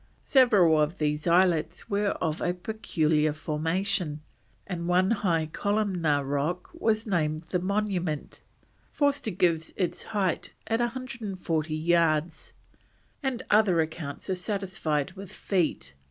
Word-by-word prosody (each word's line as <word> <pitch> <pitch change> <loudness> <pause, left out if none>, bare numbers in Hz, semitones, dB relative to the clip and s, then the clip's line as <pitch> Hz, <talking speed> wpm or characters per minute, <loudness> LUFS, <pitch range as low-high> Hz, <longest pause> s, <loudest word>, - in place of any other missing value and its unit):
Several 200 - +5
of 150 +5 0
these 150 +1 -1
islets 170 -2 +2
were 200 0 0
of 160 -1 -1
a 180 - 0
peculiar 160 -7 0
formation, 160 +1 -1 0.4
and 170 -1 -4
one 185 +3 +3
high 175 -7 +1
columnar 185 -8 +1
rock 145 +6 -2
was 225 -9 0
named 155 -6 0
the 180 - +1
Monument; 185 -5 -2 0.5
Forster 285 -5 +1
gives 170 -4 0
its 180 -3 -1
height 200 -5 -1
as 225 +1 0
140 205 - -2
yards, 165 -1 +1 0.7
the 265 -4 -2
other 205 -5 +4
accounts 155 -2 -3
are 190 - 0
satisfied 180 -5 -2
with 195 0 -10
feet. 165 - -1
180 Hz, 120 wpm, -27 LUFS, 155-205 Hz, 0.7 s, Several